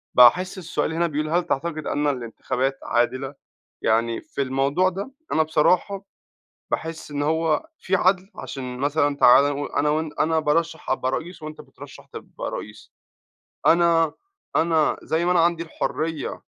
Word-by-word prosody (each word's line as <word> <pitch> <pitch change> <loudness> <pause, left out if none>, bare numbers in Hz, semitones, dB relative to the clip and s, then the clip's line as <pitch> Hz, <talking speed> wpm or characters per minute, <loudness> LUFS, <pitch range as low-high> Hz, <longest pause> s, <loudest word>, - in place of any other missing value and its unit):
باحس 180 +11 +6
السؤال 165 -2 -2
هنا 170 +1 +1
بيقول 155 -1 -2
هل 175 +3 +2
تعتقد 155 -1 -3
أن 145 +1 0
الانتخابات 130 +1 -2
عادلة؟ 130 +3 0 0.5
يعني 115 +1 +1
في - - -5
الموضوع 135 +7 +1
ده 195 +8 -6 0.2
أنا 160 - +4
بصراحة 180 +5 +1 0.7
باحس 165 -1 -4
إن 145 0 -2
هو 160 - +1
في 190 - 0
عدل 190 +1 +2
عشان 125 -2 -6
مثلًا 145 +1 +1
تعالَ 140 0 +7
نقو 145 0 -3
أنا 150 +1 0
وأن 155 +1 -1
أنا 160 0 +2
بارَشَح 160 +2 -1
أبقى 130 0 0
رئيس 165 +3 -5
وأنت 155 0 -8
بترَشَح - - -13
تبقى - - -7
رئيس. 105 0 -8 0.7
أنا 165 -2 +4 0.4
أنا 160 -2 +2
زي 165 +2 0
ما 180 - +2
أنا 180 - +3
عندي 170 0 +2
الحرية، 160 -1 -3
155 Hz, 150 wpm, -23 LUFS, 140-170 Hz, 0.7 s, تعالَ